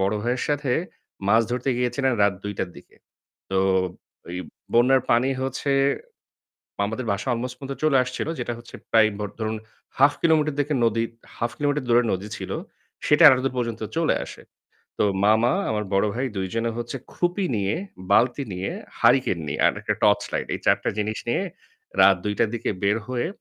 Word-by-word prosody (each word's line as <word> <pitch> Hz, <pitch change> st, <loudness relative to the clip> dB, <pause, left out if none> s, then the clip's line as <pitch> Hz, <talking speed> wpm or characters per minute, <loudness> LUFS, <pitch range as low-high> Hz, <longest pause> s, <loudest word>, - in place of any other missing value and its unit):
বড় 95 Hz, +2 st, +1 dB
ভাইয়ের 120 Hz, +2 st, -1 dB
সাথে 145 Hz, -3 st, 0 dB, 0.6 s
মাছ 115 Hz, +2 st, +5 dB
ধরতে 125 Hz, +2 st, -1 dB
গিয়েছিলেন 125 Hz, +2 st, +1 dB
রাত 100 Hz, -1 st, +3 dB
২ঃ০০ 105 Hz, -, -2 dB
টার -, -, -1 dB
দিকে। -, -, -16 dB, 0.5 s
তো 95 Hz, -, +1 dB, 0.7 s
এই 90 Hz, -, -3 dB, 0.3 s
বন্যার 125 Hz, +2 st, +5 dB
পানি 120 Hz, +3 st, +4 dB
হচ্ছে 135 Hz, +1 st, -1 dB, 1.1 s
মামাদের 110 Hz, +4 st, -2 dB
বাসায় 100 Hz, +6 st, -1 dB
আলমোস্ট 120 Hz, +2 st, -4 dB
পর্যন্ত 135 Hz, 0 st, -5 dB
চলে 155 Hz, -3 st, +4 dB
আসছিল। 125 Hz, -, -4 dB
যেটা 120 Hz, -1 st, -2 dB
হচ্ছে 120 Hz, -, -12 dB, 0.2 s
প্রায় 110 Hz, -1 st, +6 dB
ভ -, -, -3 dB, 0.2 s
ধরুন, 110 Hz, 0 st, -1 dB, 0.4 s
1/2 140 Hz, +2 st, +6 dB
কিলোমিটার 155 Hz, -3 st, +3 dB
দিকে 145 Hz, +1 st, 0 dB
নদী 115 Hz, 0 st, +1 dB, 0.3 s
1/2 115 Hz, 0 st, -1 dB
কিলোমিটার 145 Hz, -2 st, 0 dB
দূরে 120 Hz, +1 st, +5 dB
নদী 95 Hz, +2 st, -4 dB
ছিল। -, -, -6 dB, 0.6 s
সেটা 150 Hz, +3 st, +5 dB
এতো 130 Hz, -3 st, +6 dB
দূর 135 Hz, -, 0 dB
পর্যন্ত 115 Hz, -2 st, -2 dB, 0.2 s
চলে 165 Hz, -1 st, +2 dB
আসে। -, -, -11 dB, 0.6 s
তো -, -, +3 dB, 0.2 s
মামা 110 Hz, +3 st, +4 dB, 0.2 s
আমার 105 Hz, -1 st, -1 dB
বড় 100 Hz, +2 st, +3 dB
ভাই 130 Hz, +3 st, -1 dB
২ 95 Hz, 0 st, -1 dB
জনে 115 Hz, 0 st, 0 dB
হচ্ছে 120 Hz, +3 st, -4 dB, 0.2 s
খুপি 175 Hz, +3 st, 0 dB
নিয়ে, 100 Hz, 0 st, 0 dB, 0.4 s
বালতি 125 Hz, +6 st, +3 dB
নিয়ে, 95 Hz, +1 st, -3 dB, 0.3 s
হারিকেন -, -, +4 dB
নিয়ে -, -, -2 dB
আর -, -, +4 dB
একটা -, -, -1 dB
টর্চ -, -, +4 dB
লাইট -, -, -1 dB
এই -, -, -5 dB
৪ -, -, +6 dB
টা -, -, +2 dB
জিনিস 105 Hz, +1 st, -1 dB
নিয়ে 120 Hz, -, +1 dB, 0.6 s
রাত 95 Hz, -, +7 dB
২ঃ০০ 105 Hz, 0 st, -1 dB
টার 115 Hz, -, +3 dB
দিকে 115 Hz, -, -2 dB
বের 105 Hz, +3 st, +3 dB
হয়ে, 125 Hz, +1 st, -1 dB
120 Hz, 180 wpm, -24 LUFS, 110-135 Hz, 1.1 s, রাত